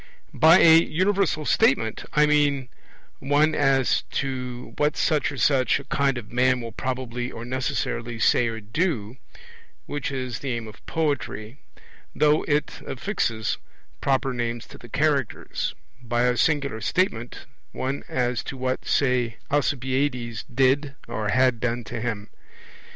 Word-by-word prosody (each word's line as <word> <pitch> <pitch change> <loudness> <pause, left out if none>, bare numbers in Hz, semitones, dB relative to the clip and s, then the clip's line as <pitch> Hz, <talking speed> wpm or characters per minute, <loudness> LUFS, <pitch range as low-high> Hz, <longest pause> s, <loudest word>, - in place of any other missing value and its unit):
By 160 +2 +7
a 160 -1 +8
universal 185 -1 0
statement 110 -6 +2
I 150 0 +5
mean 145 -3 +2 0.5
one 145 +3 +2
as 135 -3 +2
to 125 -2 -4
what 150 0 +1
such 150 -2 +1
or 145 - -7
such 130 -1 +3
a - - -9
kind 140 -2 0
of 110 -3 -8
man 125 +1 +3
will 115 -1 -6
probably 125 -1 -4
or 115 - -7
necessarily 120 -2 -2
say 120 +2 +3
or 115 0 -3
do 115 - -2 0.7
which 145 - -3
is 130 -4 -4
the 135 -3 -3
aim 115 -1 -4
of 105 -1 -13
poetry, 140 -6 -2 0.6
though 150 0 +4
it 150 0 0
affixes 125 - -2 0.4
proper 135 -1 +1
names 120 -1 -3
to - - -12
the 120 - -13
characters; 140 -3 -1 0.3
by 120 0 0
a 125 0 +3
singular 140 -5 +1
statement, 120 - -1 0.3
one 135 +2 -3
as 125 -2 0
to 135 - -6
what, 130 0 -2
say, 125 -4 +1
Alcibiades 130 -4 0
did 135 +3 +2
or 105 -1 -3
had 130 +1 +3
done 120 0 -1
to 115 +1 -6
him. 110 -3 -3
130 Hz, 140 wpm, -24 LUFS, 120-145 Hz, 0.7 s, a